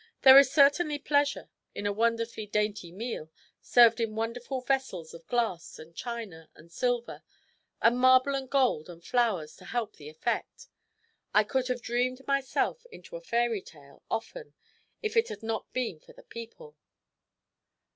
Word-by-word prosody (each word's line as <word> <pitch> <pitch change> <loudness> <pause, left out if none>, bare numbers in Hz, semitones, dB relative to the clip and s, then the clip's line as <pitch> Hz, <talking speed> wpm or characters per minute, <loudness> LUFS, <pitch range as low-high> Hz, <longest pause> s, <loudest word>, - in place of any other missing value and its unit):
There 265 0 +11
is 275 -2 +4
certainly 290 +2 +4
pleasure 285 0 0 0.2
in 205 - -5
a 205 - +1
wonderfully 230 0 -1
dainty 205 -4 -2
meal, 195 -5 -5 0.3
served 235 -1 +5
in 225 -2 -2
wonderful 235 +4 -3
vessels 250 -11 -2
of 165 -1 -13
glass 225 -9 -2
and 160 +2 -13
china 225 -10 -7
and 165 +2 -18
silver, 245 +5 -2 0.6
and 240 +2 +4
marble 255 +2 +5
and 270 -1 -3
gold 255 - +1
and 170 -1 -12
flowers 220 -11 0
to - - -15
help 235 -3 -3
the 150 0 -10
effect. 160 +10 -4 0.7
I 210 - +6
could 255 +4 -1
have 250 -2 -3
dreamed 250 +3 -1
myself 275 - 0
into - - -12
a - - -7
fairy 235 - 0
tale, 140 -5 -17
often, 455 - -5 0.5
if 435 +1 -2
it 455 0 +4
had 440 - -8
not 225 0 -4
been 235 -11 -3
for - - -18
the - - -16
people." 235 - -11
235 Hz, 155 wpm, -29 LUFS, 205-265 Hz, 0.7 s, There